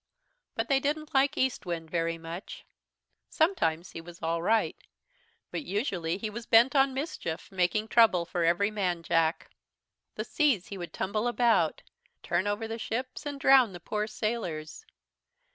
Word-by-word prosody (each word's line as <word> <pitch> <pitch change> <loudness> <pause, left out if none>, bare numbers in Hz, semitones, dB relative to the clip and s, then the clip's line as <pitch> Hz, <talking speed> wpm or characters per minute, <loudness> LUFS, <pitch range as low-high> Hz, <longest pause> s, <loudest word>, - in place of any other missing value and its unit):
"But - - -1
they 275 -2 +3
didn't 300 +2 -2
like 275 +2 +3
Eastwind 175 -11 -2
very 165 -1 0
much. 165 +3 -8 0.6
Sometimes 180 - +1
he 165 - -7
was 170 +1 -12
all 165 +1 -1
right, 220 +5 +2 0.8
but - - -3
usually 190 - -2
he 220 - -3
was 225 +2 -7
bent 235 +5 +5
on 270 -1 +4
mischief, 265 - -4
making 190 +4 +1
trouble 220 -7 +4
for 170 0 -2
every 175 +5 +2
man 180 -5 -1
Jack. 165 0 +1 0.6
The - - -3
seas 280 - +1
he 200 - -6
would 175 - -6
tumble 210 +5 -1
about, 235 -9 +2 0.4
turn 175 +3 0
over 205 +2 -1
the 225 +1 -5
ships, 255 +6 -4
and 285 -1 -5
drown 265 -7 +5
the 175 - -8
poor 210 +5 -2
sailors. 215 - -4
210 Hz, 155 wpm, -29 LUFS, 170-250 Hz, 0.8 s, bent